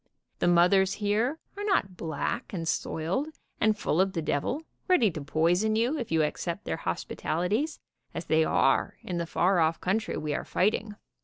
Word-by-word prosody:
The -, -, +2 dB
mothers 180 Hz, +2 st, +4 dB
here 220 Hz, +8 st, 0 dB, 0.2 s
are 405 Hz, -, -5 dB
not 295 Hz, -, +1 dB
black 170 Hz, -, -3 dB
and 165 Hz, -3 st, -3 dB
soiled, 170 Hz, -, -1 dB, 0.3 s
and 215 Hz, 0 st, +3 dB
full 180 Hz, -3 st, +1 dB
of 190 Hz, 0 st, +1 dB
the 165 Hz, -, -1 dB
devil, 160 Hz, -, -1 dB, 0.2 s
ready 260 Hz, -, +4 dB
to 155 Hz, -, -6 dB
poison 175 Hz, +9 st, +2 dB
you 235 Hz, +7 st, +1 dB
if 235 Hz, -, -5 dB
you 160 Hz, -1 st, +3 dB
accept 170 Hz, +5 st, -3 dB
their -, -, -2 dB
hospitalities, 205 Hz, -, -2 dB, 0.3 s
as -, -, -5 dB
they 160 Hz, 0 st, +3 dB
are 135 Hz, -3 st, +2 dB
in 175 Hz, -2 st, -3 dB
the 170 Hz, -, -2 dB
far 180 Hz, +2 st, +2 dB
off 160 Hz, 0 st, +2 dB
country 220 Hz, +4 st, -1 dB
we 150 Hz, -1 st, -2 dB
are -, -, -2 dB
fighting. 210 Hz, +2 st, 0 dB
185 Hz, 175 wpm, -28 LUFS, 165-220 Hz, 0.3 s, mothers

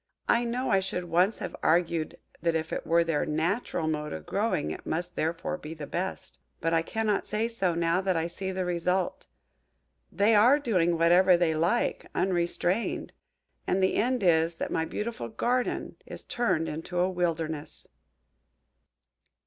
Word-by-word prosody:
I 240 Hz, 0 st, +3 dB
know 245 Hz, +2 st, -1 dB
I 195 Hz, -, +5 dB
should 190 Hz, -1 st, -3 dB
once 180 Hz, +5 st, +2 dB
have -, -, -5 dB
argued 165 Hz, -1 st, +1 dB, 0.2 s
that 165 Hz, 0 st, +1 dB
if 160 Hz, 0 st, -2 dB
it -, -, -4 dB
were 170 Hz, +1 st, +4 dB
their 165 Hz, -3 st, 0 dB
natural 160 Hz, +2 st, -1 dB
mode 150 Hz, -1 st, -2 dB
of 80 Hz, -1 st, -7 dB
growing 75 Hz, -, 0 dB
it -, -, -7 dB
must 175 Hz, +2 st, -3 dB
therefore 170 Hz, +3 st, -2 dB
be 155 Hz, 0 st, -8 dB
the 150 Hz, -2 st, -6 dB
best. 180 Hz, +6 st, -5 dB, 0.2 s
But 165 Hz, 0 st, 0 dB
I 165 Hz, -, +4 dB
cannot 215 Hz, +3 st, -1 dB
say 215 Hz, +2 st, 0 dB
so, 195 Hz, -7 st, -1 dB
now 170 Hz, +2 st, +1 dB
that 190 Hz, -1 st, 0 dB
I 165 Hz, -, 0 dB
see 190 Hz, +3 st, -4 dB
the 185 Hz, -1 st, -2 dB
result. 180 Hz, +1 st, -1 dB, 0.8 s
They 205 Hz, +3 st, +3 dB
are 235 Hz, +7 st, +6 dB
doing 180 Hz, -, +1 dB
whatever 175 Hz, +2 st, +5 dB
they 170 Hz, -2 st, +2 dB
like, 170 Hz, +9 st, 0 dB
unrestrained 180 Hz, +3 st, 0 dB, 0.5 s
and 190 Hz, +1 st, +1 dB
the 190 Hz, -, +3 dB
end 245 Hz, 0 st, +1 dB
is, 165 Hz, -1 st, +3 dB
that -, -, -4 dB
my 160 Hz, -, 0 dB
beautiful 210 Hz, -, -4 dB
GARDEN 250 Hz, -, -1 dB
is -, -, -7 dB
turned 195 Hz, -9 st, 0 dB
into 165 Hz, +3 st, -5 dB
a 180 Hz, -, +3 dB
WILDERNESS." 165 Hz, -4 st, -3 dB
175 Hz, 165 wpm, -28 LUFS, 165-195 Hz, 0.8 s, are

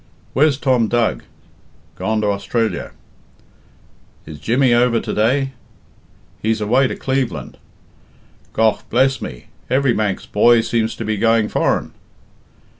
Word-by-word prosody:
"Where's 140 Hz, 0 st, +3 dB
Tom 130 Hz, -5 st, +2 dB
Dug?" 120 Hz, 0 st, 0 dB, 0.7 s
"Gone 110 Hz, 0 st, -1 dB
to 105 Hz, -, 0 dB
Austrilla." 110 Hz, +3 st, -2 dB, 1.4 s
"Is 75 Hz, -1 st, -10 dB
Jimmy 125 Hz, +2 st, +2 dB
over 120 Hz, -1 st, +3 dB
to -, -, -5 dB
day?" 135 Hz, +5 st, +1 dB, 0.9 s
"He's 110 Hz, 0 st, 0 dB
away 125 Hz, +6 st, +2 dB
to -, -, -4 dB
Cleveland." 130 Hz, -2 st, -3 dB, 0.9 s
"Gough, 110 Hz, -2 st, +1 dB
bless 130 Hz, +2 st, +2 dB
me, -, -, -7 dB, 0.2 s
every 130 Hz, -1 st, +2 dB
Manx 105 Hz, -4 st, -2 dB
boy 115 Hz, +2 st, +4 dB
seems 115 Hz, 0 st, -1 dB
to 115 Hz, -, -6 dB
be 110 Hz, 0 st, -1 dB
going 115 Hz, 0 st, +2 dB
foreign." -, -, 0 dB
115 Hz, 120 wpm, -19 LUFS, 110-130 Hz, 1.4 s, boy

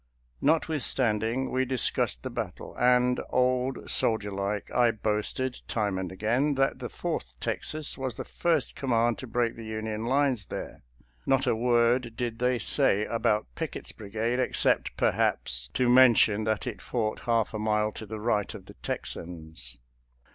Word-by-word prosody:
Not 155 Hz, +3 st, +3 dB
withstanding 125 Hz, -5 st, +1 dB
we 130 Hz, 0 st, +1 dB
discussed 125 Hz, -, 0 dB
the -, -, -4 dB
battle, -, -, -6 dB
and, 125 Hz, 0 st, +4 dB
old 125 Hz, +1 st, 0 dB
soldier 105 Hz, -3 st, +1 dB
like, 100 Hz, +1 st, -3 dB
I 120 Hz, -1 st, +4 dB
boasted, 110 Hz, +4 st, -1 dB
time 100 Hz, -4 st, -1 dB
and 95 Hz, -1 st, -4 dB
again, 120 Hz, +9 st, +1 dB
that 135 Hz, 0 st, +1 dB
the -, -, -5 dB
Fourth -, -, -4 dB
Texas 155 Hz, -2 st, -2 dB
was 130 Hz, -4 st, -2 dB
the -, -, -5 dB
first 165 Hz, -5 st, 0 dB
command 120 Hz, -3 st, +1 dB
to 130 Hz, -, -7 dB
break 120 Hz, 0 st, 0 dB
the 115 Hz, -, -9 dB
Union 110 Hz, 0 st, -4 dB
lines 130 Hz, -6 st, +1 dB
there, -, -, -7 dB, 0.5 s
not 135 Hz, 0 st, +3 dB
a -, -, +2 dB
word 120 Hz, 0 st, +2 dB
did 120 Hz, -2 st, -3 dB
they 125 Hz, 0 st, +2 dB
say 105 Hz, -1 st, +2 dB
about 110 Hz, -2 st, +1 dB
Pickett's -, -, -5 dB
brigade, 110 Hz, +4 st, -2 dB
except, 130 Hz, -, +1 dB
perhaps, 60 Hz, 0 st, +1 dB
to 125 Hz, -1 st, +2 dB
men 125 Hz, -1 st, +7 dB
tion 105 Hz, 0 st, +3 dB
that 110 Hz, -1 st, -1 dB
it 125 Hz, -4 st, -5 dB
fought 110 Hz, -3 st, -2 dB
half 115 Hz, -2 st, +2 dB
a 110 Hz, -, -3 dB
mile 105 Hz, 0 st, +1 dB
to 110 Hz, -, -8 dB
the 110 Hz, +1 st, -6 dB
right 105 Hz, -2 st, 0 dB
of -, -, -10 dB
the -, -, -12 dB
Texans. 80 Hz, -8 st, -6 dB
115 Hz, 160 wpm, -28 LUFS, 105-125 Hz, 0.5 s, men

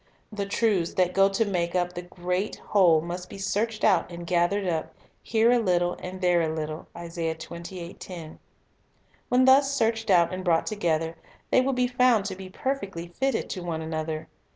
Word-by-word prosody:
The 200 Hz, -2 st, -3 dB
truths 200 Hz, -5 st, +1 dB
that 180 Hz, -1 st, +2 dB
go 195 Hz, 0 st, +5 dB
to 195 Hz, +3 st, +1 dB
make 175 Hz, -3 st, -1 dB
up 180 Hz, 0 st, 0 dB
the 175 Hz, -, -5 dB
great 180 Hz, +2 st, -3 dB
whole 175 Hz, -6 st, +3 dB
must 175 Hz, +2 st, -6 dB
be -, -, -9 dB
searched 215 Hz, +3 st, -1 dB
out 190 Hz, -4 st, +3 dB
and 170 Hz, 0 st, -7 dB
gathered 180 Hz, +3 st, +1 dB
up, 160 Hz, -3 st, -2 dB, 0.3 s
"here 230 Hz, +1 st, +3 dB
a 245 Hz, -, +4 dB
little, 175 Hz, -4 st, +1 dB
and 185 Hz, +1 st, -7 dB
there 175 Hz, -1 st, +3 dB
a 160 Hz, -, 0 dB
little." 155 Hz, 0 st, -5 dB
1 170 Hz, -1 st, -8 dB, 2.2 s
When 255 Hz, +1 st, +4 dB
thus 270 Hz, +1 st, +6 dB
searched 225 Hz, -4 st, 0 dB
out 175 Hz, -2 st, +4 dB
and 185 Hz, 0 st, -4 dB
brought 170 Hz, -3 st, +2 dB
together, 165 Hz, -6 st, -1 dB, 0.3 s
they 255 Hz, -, +5 dB
will 270 Hz, +1 st, 0 dB
be 250 Hz, 0 st, +2 dB
found 245 Hz, -4 st, +3 dB
to 195 Hz, -2 st, -3 dB
be 190 Hz, 0 st, -9 dB
perfectly 195 Hz, -8 st, -4 dB
fitted 265 Hz, +9 st, -1 dB
to 185 Hz, -, -4 dB
one 165 Hz, -2 st, -3 dB
another. 160 Hz, 0 st, -4 dB
185 Hz, 175 wpm, -26 LUFS, 170-220 Hz, 2.2 s, thus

